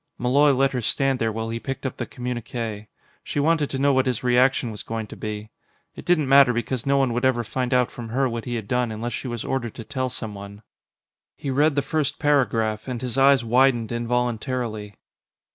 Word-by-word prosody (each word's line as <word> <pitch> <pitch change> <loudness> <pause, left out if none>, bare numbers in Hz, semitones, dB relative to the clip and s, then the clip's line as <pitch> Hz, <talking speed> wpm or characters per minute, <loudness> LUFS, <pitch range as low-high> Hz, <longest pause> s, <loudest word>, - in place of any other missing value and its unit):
Malloy 140 +4 +4
let 135 0 +2
her 125 -2 -2
stand 135 +3 +1
there 115 -1 0
while 110 +1 -4
he 115 +1 -3
picked 135 +5 -5
up 130 - -3
the - - -4
communique. 120 -3 -5 0.4
She - - -3
wanted 155 0 +2
to 135 - -3
know 140 +1 +3
what 130 0 +2
his 125 -2 -1
reaction 125 0 +3
was 105 - -8
going 110 -1 -4
to - - -10
be; 105 0 -6 0.4
it - - -11
didn't 165 -5 +2
matter 135 -2 +6
because 120 +2 -3
no 140 0 +3
one 135 -3 +2
would 120 +2 -2
ever 130 -2 +2
find 125 +2 -3
out 125 -1 +2
from 115 -2 -8
her 130 +3 +1
what 115 -2 -4
he 120 - -3
had 110 -3 -5
done 125 0 0
unless 115 +3 -4
she - - -4
was 120 -2 -4
ordered 120 -4 -2
to 115 - -7
tell 130 0 -3
someone. 105 -4 -7 0.7
He 140 - -3
read 145 +2 +3
the 145 - +1
first 150 0 -1
paragraph, 115 -7 +1
and 125 -2 -3
his 125 -1 -4
eyes 135 -2 +5
widened 120 -1 +3
involuntarily. 120 -2 -2
125 Hz, 210 wpm, -24 LUFS, 115-135 Hz, 0.7 s, matter